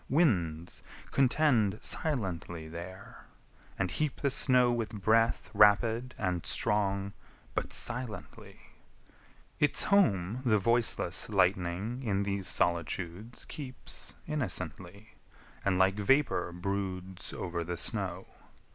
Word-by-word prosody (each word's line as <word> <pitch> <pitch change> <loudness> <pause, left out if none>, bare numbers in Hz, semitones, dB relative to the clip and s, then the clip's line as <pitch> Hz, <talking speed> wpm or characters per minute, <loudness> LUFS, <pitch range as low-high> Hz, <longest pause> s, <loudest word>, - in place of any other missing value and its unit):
Winds 90 - +1 0.3
contend 125 -6 +3
Silently 90 - -1
there, 85 +4 -9 0.5
and 95 -2 -1
heap 150 -2 -1
the 140 - +1
snow 125 -2 +5
with 115 -2 -1
breath 115 +3 +2
Rapid 110 +4 +4
and 90 -3 -1
strong, 100 -1 0 0.4
but - - -2
silently! 125 -3 -2 1.0
Its 145 -1 +2
home 115 - +2
The 110 -4 +3
voiceless 115 +3 +1
lightning 95 +4 0
in 100 -5 0
these 100 -2 -2
solitudes 85 +6 -1
Keeps 130 -4 -6
innocently, 100 - -4 0.5
and 95 -2 +1
like 95 +2 +3
vapour 135 -3 +2
broods 95 0 -4
Over 85 -2 -4
the 85 +1 -4
snow. - - -1
100 Hz, 100 wpm, -31 LUFS, 90-120 Hz, 1.0 s, snow